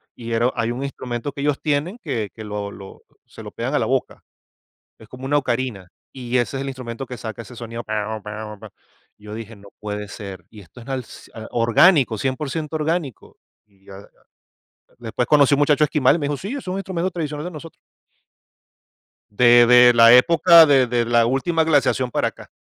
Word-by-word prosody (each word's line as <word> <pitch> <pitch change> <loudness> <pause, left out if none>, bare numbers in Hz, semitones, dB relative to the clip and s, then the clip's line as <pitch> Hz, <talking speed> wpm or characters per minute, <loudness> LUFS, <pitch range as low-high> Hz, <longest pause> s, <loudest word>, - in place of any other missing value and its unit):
Y 115 -1 -8
era 115 +2 +1
hay 115 -1 -1
un 125 +3 -5
instrumento 130 -1 -5
que 140 - -7
ellos 145 -1 0
tienen 150 +7 -1
que 115 -9 -3
que 110 - -10
lo 105 -1 -5
lo 95 -1 -12 0.2
se - - -13
lo - - -9
pegan - - -4
a - - +2
la - - 0
boca, - - -2 0.8
es 110 - -15
como 125 +3 -10
una 145 +2 +1
ocarina, 120 -7 -3 0.2
y 125 -1 -3
ese 125 +2 -1
es - - -4
el 135 - -5
instrumento 130 0 -7
que 125 - -8
saca 110 +1 -7
ese 120 +1 -13
sonido: 115 0 -7
"Pau, 110 0 -4
pau, 105 0 -8
pa" 110 0 -11 0.5
Yo 105 0 -11
dije: 115 0 -8
"No 100 -1 -16
puede 105 0 -5
ser, 95 -3 -9
y 110 - -13
esto 95 +6 -16
es 115 - -14
al 135 -2 -3
ci - - -15 0.2
orgánico, 120 - +3
cien 130 -1 -1
por 145 -1 -5
ciento 155 0 -4
orgánico". 155 - -3 0.3
Y 100 -2 -31
ya, 100 - -12
ah, 100 - -14 0.9
después 120 +1 -3
conocí 145 -2 +5
un 140 - -1
muchacho 145 +1 +3
esquimal 145 -1 +2
y - - -4
me 145 - -2
dijo: 145 - -2
"Sí, 200 - -6
es 275 - -8
un 185 +1 -3
instrumento 185 -2 -3
tradicional 150 -4 -5
de 180 - -5
nosotros". 165 0 -11 1.5
De 120 +2 +5
de 125 0 +7
la 115 0 +7
época 165 +5 +7
de 135 -4 +4
de 120 0 0
la 120 0 +3
última 160 +7 0
glaciación 140 -5 +1
para - - 0
acá. - - -15
125 Hz, 205 wpm, -21 LUFS, 110-145 Hz, 1.5 s, de